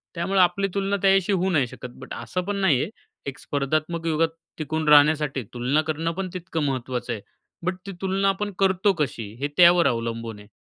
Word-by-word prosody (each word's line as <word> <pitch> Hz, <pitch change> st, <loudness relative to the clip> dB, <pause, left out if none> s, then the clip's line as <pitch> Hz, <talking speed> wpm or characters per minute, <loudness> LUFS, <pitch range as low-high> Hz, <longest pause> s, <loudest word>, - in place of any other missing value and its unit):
त्यामुळं 190 Hz, +3 st, 0 dB
आपली 195 Hz, +2 st, +2 dB
तुलना 200 Hz, 0 st, 0 dB
त्याच्याशी 195 Hz, 0 st, +3 dB
होऊ 190 Hz, +1 st, +1 dB
नाही 140 Hz, -7 st, +2 dB
शकत. 125 Hz, -, -9 dB
बट -, -, -9 dB
असं 180 Hz, -, -3 dB
पण 205 Hz, 0 st, -2 dB
नाही 150 Hz, -10 st, +3 dB
आहे, -, -, -2 dB, 0.4 s
एक 140 Hz, 0 st, -5 dB
स्पर्धात्मक 155 Hz, +4 st, -2 dB
युगात 160 Hz, +1 st, +2 dB, 0.3 s
टिकून 155 Hz, 0 st, -3 dB
राहण्यासाठी 150 Hz, -3 st, +4 dB
तुलना 125 Hz, +5 st, +1 dB
करणं 165 Hz, +2 st, -1 dB
पण 185 Hz, +1 st, -4 dB
तितकं 170 Hz, -3 st, -3 dB
महत्त्वाचं 130 Hz, -3 st, -2 dB
आहे 105 Hz, -, -6 dB, 0.4 s
बट 185 Hz, -, 0 dB
ती 200 Hz, -, -5 dB
तुलना 195 Hz, +1 st, +1 dB
आपण 205 Hz, +1 st, -2 dB
करतो 190 Hz, +1 st, +3 dB
कशी, 120 Hz, -, -3 dB
हे 145 Hz, -, 0 dB
त्यावर 175 Hz, -1 st, +7 dB
अवलंबून 115 Hz, -2 st, -3 dB
आहे. 105 Hz, -, -14 dB
160 Hz, 185 wpm, -24 LUFS, 135-190 Hz, 0.4 s, त्यावर